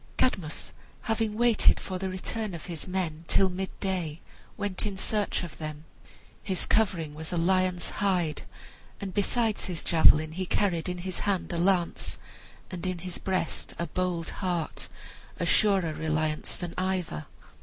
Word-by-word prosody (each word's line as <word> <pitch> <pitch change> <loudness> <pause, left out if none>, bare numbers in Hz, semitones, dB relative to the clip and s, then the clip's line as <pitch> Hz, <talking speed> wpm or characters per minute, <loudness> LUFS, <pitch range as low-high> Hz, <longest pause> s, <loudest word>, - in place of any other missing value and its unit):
Cadmus, 180 -11 0 0.3
having 220 -2 0
waited 240 -2 +5
for 185 -1 -4
the 190 0 -2
return 195 +2 -3
of 165 - -7
his 170 -2 -4
men 175 -4 -2
till 190 -1 +4
midday, 185 -3 -2 0.4
went 205 -3 -1
in 195 -2 -4
search 205 0 0
of 175 - -8
them. 155 0 -6 0.6
His 190 -3 -1
covering 180 -8 +2
was 155 +2 -6
a 175 - 0
lion's 185 +1 +2
hide, 180 -6 +1 0.6
and 195 -3 -5
besides 220 +2 +1
his 180 -4 -3
javelin 155 -1 +6
he 185 +3 -3
carried 180 -5 +1
in 180 - -2
his 185 -2 -2
hand 190 -3 0
a 170 - -1
lance, 180 -1 +1 0.5
and 180 -2 -5
in 185 -1 -1
his 180 +1 -5
breast 185 -4 -2
a 170 - -1
bold 175 0 -1
heart, 175 -4 -1 0.5
a - - +1
surer 195 -7 +4
reliance 155 -1 -1
than 175 -1 -5
either. 185 - -1
185 Hz, 155 wpm, -29 LUFS, 165-195 Hz, 0.6 s, javelin